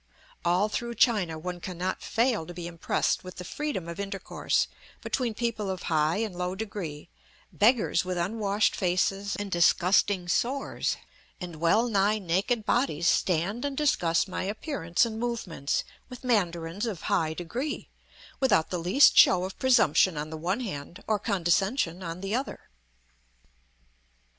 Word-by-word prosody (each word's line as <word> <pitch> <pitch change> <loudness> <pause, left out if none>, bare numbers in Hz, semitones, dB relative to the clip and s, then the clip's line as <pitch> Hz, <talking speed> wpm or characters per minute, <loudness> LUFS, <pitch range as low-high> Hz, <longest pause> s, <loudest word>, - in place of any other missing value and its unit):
All 180 +4 +2
through 235 +2 -4
China 205 -9 +2
one 180 +2 -5
cannot 185 +1 -4
fail 230 -8 0
to 175 - -9
be 175 -1 -6
impressed 170 -1 -1
with 185 0 -9
the 180 - -7
freedom 290 - -4
of 170 +2 -7
intercourse 195 -1 -1 0.4
between 240 -4 -2
people 220 -4 -2
of 185 -2 -4
high 155 +1 +2
and 215 -4 -2
low 180 +1 -2
degree; 185 -7 -6 0.4
beggars 225 +2 +3
with 185 -1 -3
unwashed 200 +3 +1
faces 195 +2 0
and 205 -1 -5
disgusting 180 +2 +3
sores 260 +9 -1 0.4
and 175 -3 -7
well 170 +9 +3
nigh 205 -1 +2
naked 200 +5 0
bodies 170 - +1
stand 185 +7 +1
and 280 -1 -3
discuss 175 - +2
my 185 - -4
appearance 205 - 0
and 220 -1 -5
movements 225 -12 -2 0.3
with 250 0 -10
mandarins 180 -3 0
of 195 -8 -5
high 160 -1 0
degree, 240 - -4 0.5
without 210 -12 +2
the 180 - -1
least 185 +12 +5
show 180 -1 +6
of 190 +1 -6
presumption 185 - +4
on 150 +1 -4
the - - -4
one 180 +9 -2
hand 170 - -6
or 215 -1 +1
condescension 190 -1 0
on 170 0 -6
the 195 +1 -3
other. 260 - -4
190 Hz, 150 wpm, -28 LUFS, 170-225 Hz, 0.5 s, show